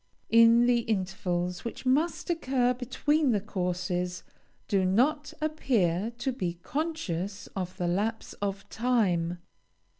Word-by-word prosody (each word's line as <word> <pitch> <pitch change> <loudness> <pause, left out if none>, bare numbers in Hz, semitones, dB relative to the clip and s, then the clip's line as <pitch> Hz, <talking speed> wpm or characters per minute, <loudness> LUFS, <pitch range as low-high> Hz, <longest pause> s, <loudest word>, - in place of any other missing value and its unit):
In 230 +1 +7
the 245 -1 +4
intervals 185 -4 -2
which 235 - -6
must 310 +7 +1
occur 260 -6 +1
between 265 +3 +1
the 210 - +2
courses, 180 -2 -2 0.4
do 195 -2 +2
not 265 +11 +2
appear 230 - +1
to 245 +2 -1
be 180 -8 -3
conscious 210 - -3
of 185 -2 -4
the 175 - -1
lapse 210 +6 -1
of 200 -1 -3
time. 190 -8 +1
220 Hz, 120 wpm, -28 LUFS, 180-255 Hz, 0.4 s, In